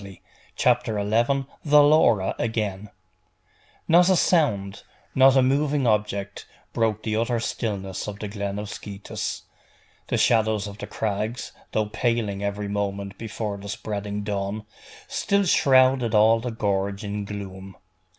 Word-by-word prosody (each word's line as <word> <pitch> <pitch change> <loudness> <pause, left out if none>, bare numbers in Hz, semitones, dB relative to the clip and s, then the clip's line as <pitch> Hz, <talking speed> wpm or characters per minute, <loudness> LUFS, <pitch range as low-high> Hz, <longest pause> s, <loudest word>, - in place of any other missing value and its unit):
CHAPTER 110 - +1
XI: 120 +7 +1 0.2
THE 150 -1 +6
LAURA 120 -10 +4
AGAIN 105 -3 -2 1.0
Not 175 +2 +5
a 190 - +5
sound, 115 - +1 0.3
not 135 0 +6
a 130 - +5
moving 140 +1 +1
object, 105 -3 -1 0.3
broke 110 -2 0
the 110 -1 -1
utter 115 +1 0
stillness 100 -5 -3
of 105 -1 -5
the 105 - -5
glen 100 -1 -4
of 105 0 -4
Scetis. 100 -1 -6 0.6
The - - 0
shadows 110 -3 +2
of 100 0 -9
the - - -6
crags, 110 +3 -3 0.2
though 110 - +1
paling 105 -2 -1
every 100 0 -2
moment 100 -1 -3
before 110 -2 -4
the 100 +1 -9
spreading 105 0 -4
dawn, 100 +1 -3 0.4
still 200 0 +1
shrouded 130 - +4
all 110 +2 +5
the 125 +2 -4
gorge 100 -2 -1
in 105 0 -3
gloom. 95 -2 -8
105 Hz, 135 wpm, -24 LUFS, 100-120 Hz, 1.0 s, THE